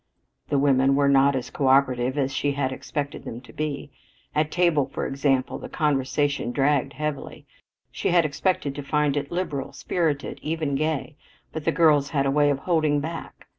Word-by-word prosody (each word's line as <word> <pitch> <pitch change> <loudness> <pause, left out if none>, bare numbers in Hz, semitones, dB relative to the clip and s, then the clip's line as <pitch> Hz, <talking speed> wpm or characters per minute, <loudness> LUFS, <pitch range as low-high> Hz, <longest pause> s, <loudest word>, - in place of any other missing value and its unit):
The 145 - +2
women 135 -1 +3
were 140 0 +3
not 140 0 +4
as 130 - -4
coöperative 130 -1 +2
as 135 -1 0
she 145 0 0
had 135 -2 -1
expected 145 +2 -5
them 115 - -6
to 125 - -16
be. 150 -2 -4 0.4
At 150 0 +1
table, 170 -6 +2
for - - -3
example, 135 -1 0
the - - -8
conversation 145 -3 0
dragged 140 +1 +1
heavily. 150 0 -5 0.5
She - - -2
had 175 -2 +4
expected 150 -1 -1
to 145 - -6
find 150 0 +1
it 145 0 -3
liberal, 170 -6 -3
spirited, 155 -5 -2
even 155 -2 -2
gay, 155 +1 -2 0.4
but 155 -1 -5
the - - +3
girls 150 -4 +4
had 140 -3 0
a 135 - +2
way 145 +1 +3
of 140 - +1
holding 155 -1 +1
back. 165 +3 -7
145 Hz, 175 wpm, -24 LUFS, 135-155 Hz, 0.5 s, not